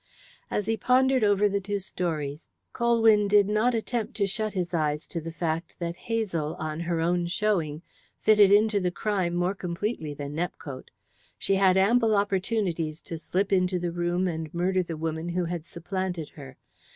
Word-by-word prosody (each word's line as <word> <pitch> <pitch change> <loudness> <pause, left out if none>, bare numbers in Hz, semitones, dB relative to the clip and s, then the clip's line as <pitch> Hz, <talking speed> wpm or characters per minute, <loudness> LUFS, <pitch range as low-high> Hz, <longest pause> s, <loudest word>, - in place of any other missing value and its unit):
As 210 - -1
he 225 +1 0
pondered 260 +1 +3
over 205 0 +4
the 200 0 0
two 205 +1 -2
stories 160 -5 -4 0.2
Colwyn 225 -3 +4
did 205 -1 +5
not 215 +4 +2
attempt 225 +1 -2
to 200 - +1
shut 215 +2 -2
his 180 -2 -2
eyes 150 -2 0
to 165 - -5
the 165 +1 -6
fact 165 0 -3
that 170 -1 -3
Hazel, 185 -9 -2
on 155 0 -4
her 170 -1 -1
own 175 +1 +1
showing, 175 -5 -1 0.4
fitted 210 -2 +6
into 210 0 +4
the 180 -2 0
crime 185 -2 -1
more 175 +2 +1
completely 175 -4 -3
than 145 0 -6
Nepcote. 155 -5 -5 0.5
She 195 - 0
had 190 -1 +4
ample 220 +3 +4
opportunities 190 -5 0
to 165 - -6
slip 195 +4 -1
into 180 -1 +2
the 175 -1 -2
room 175 +2 0
and 160 -3 -4
murder 185 +2 +1
the 170 -3 -5
woman 160 +1 -3
who 175 0 -1
had 170 -2 -4
supplanted 180 -2 -4
her. 135 -3 -12
180 Hz, 175 wpm, -27 LUFS, 165-205 Hz, 0.5 s, fitted